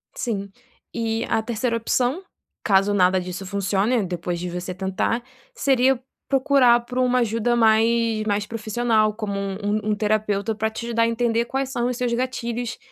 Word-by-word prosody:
Sim, 200 -5 -3 0.4
e 225 0 -1
a 225 - +2
3ª 230 +1 -1
opção, 250 - 0 0.4
caso 200 0 +3
nada 185 -1 +3
disso 180 +2 -6
funcione 200 +4 0
depois 175 0 -3
de 180 +1 -4
você 180 +1 -5
tentar, 195 +5 -1 0.3
seria 265 -1 +2 0.3
procurar 260 -3 +4
por 250 +1 -8
uma 250 0 +3
ajuda 230 +1 +1
mais 225 0 +3
mais 205 0 0
profissional 220 -1 0
como 210 -2 -4
um 195 -1 -3
um 210 +1 +1
um 210 - +2
terapeuta 210 0 0
para 220 +1 -1
te 235 +1 -5
dar 230 - +3
a 230 - +3
entender 230 0 +1
quais 270 +1 -2
são 240 -2 -1
os 250 - -2
seus 245 -1 -1
gatilhos 240 -1 -3
225 Hz, 165 wpm, -23 LUFS, 205-240 Hz, 0.4 s, procurar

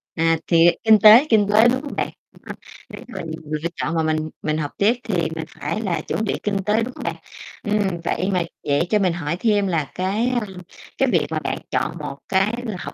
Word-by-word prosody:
À, 165 0 +2
thì, 165 -1 +5
à, - - +7
kinh 220 -1 +6
tế 220 +7 +8
kinh 210 -3 +4
tế, 220 +3 +6
đúng 260 +2 +1
không 290 - -7
bạn? - - -1 0.2
Đúng - - -21
không? - - -7 0.3
Nếu - - -10
mà 245 - -8
nhiều 160 -1 -7
người 155 0 -2
lựa 170 - 0
chọn 165 +2 -2
mà 160 - +1
mình 155 0 -1
mình 155 0 -1
học 145 -2 -3
tiếp 210 +4 +4
thì 220 -4 -2 0.2
mình 160 -1 -4
phải 215 - -3
là 185 -6 -1
chuẩn 220 - -3
bị 205 - -2
kinh 205 -1 0
tế, 215 +2 +2
đúng 250 +2 -6
không - - -9
bạn? - - -3 0.5
Ừm, 205 -5 -1
vậy 185 +3 -1
mà 180 -2 +1 0.2
vậy 145 +4 +1
cho 210 - +3
mình 185 -3 +1
hỏi 165 -1 -3
thêm 205 -3 +2
là 160 -5 -1
cái, 195 +6 0
a, 240 -4 -1 0.5
cái 270 -1 +2
việc 170 -6 +2
mà 160 -1 -2
bạn - - -3
chọn 170 - -1
một 145 -3 -6
cái 195 +3 +2
là 215 -4 -4
học - - -7
190 Hz, 250 wpm, -21 LUFS, 165-215 Hz, 0.5 s, tế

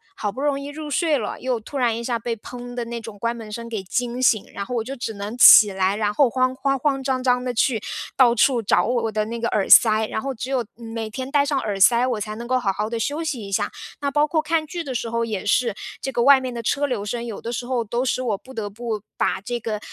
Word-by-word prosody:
好 205 -2 -3
不 260 - -9
容 285 -1 +1
易 280 - -7
入 300 0 -7
睡 320 -2 +1
了， 220 - -4
又 250 -2 -1
突 275 +6 -8
然 235 -3 +1
一 235 - -4
下 235 0 -1
被 230 0 -4
砰 245 +2 -9
的 240 -1 -3
那 235 0 -5
种 210 -2 -10
关 235 0 -1
门 220 -2 -9
声 235 +2 -6
给 220 -4 -4
惊 240 +6 -2
醒。 220 -5 +3
然 200 - -4
后 250 - -6
我 230 - 0
就 270 +2 -5
只 230 -3 -4
能 205 +4 -6
起 210 -4 +9
来， 190 +1 +1
然 210 -1 0
后 260 +2 +4
慌 255 +1 +1
慌 275 0 0
慌 270 -1 0
张 260 -1 -1
张 250 -1 +2
地 250 -1 -2
去 225 -2 +1 0.3
到 245 -3 +5
处 240 +1 +3
找 210 - +2
我 240 -1 0
我 225 - -1
的 215 0 -1
那 235 +2 -5
个 230 0 -1
耳 200 - 0
塞， 220 -1 +7
然 220 - -3
后 275 0 -3
只 255 +3 -6
有 250 -4 0
每 225 -1 -6
天 260 +3 -6
戴 285 0 +3
上 280 -2 0
耳 205 -2 -3
塞， 240 +5 +5
我 225 -4 -2
才 215 0 -4
能 235 +1 -7
够 255 +1 +2
好 210 -6 0
好 210 +3 -3
地 230 - -3
休 290 +8 -2
息 270 -10 -3
一 195 - -9
下。 - - 0 0.3
那 285 -1 -1
包 295 +1 +2
括 310 +1 0
看 325 -1 0
剧 340 +2 -5
的 260 -2 -4
时 230 0 -2
候 230 0 -1
也 210 -3 -4
是， 230 +1 +2 0.3
这 270 - -3
个 240 - 0
外 275 +2 +7
面 255 -1 -5
的 235 - -4
车 280 +5 0
流 245 -7 -2
声， 235 +3 -4
有 225 -4 -6
的 235 - -5
时 240 +1 -4
候 250 -2 -1
都 240 +4 -2
使 255 - 0
我 220 -5 -1
不 260 - -14
得 215 -4 -4
不 220 -1 -4 0.2
把 - - 0
这 240 +3 -4
个， 215 -2 -3
235 Hz, 305 characters per minute, -22 LUFS, 220-260 Hz, 0.3 s, 起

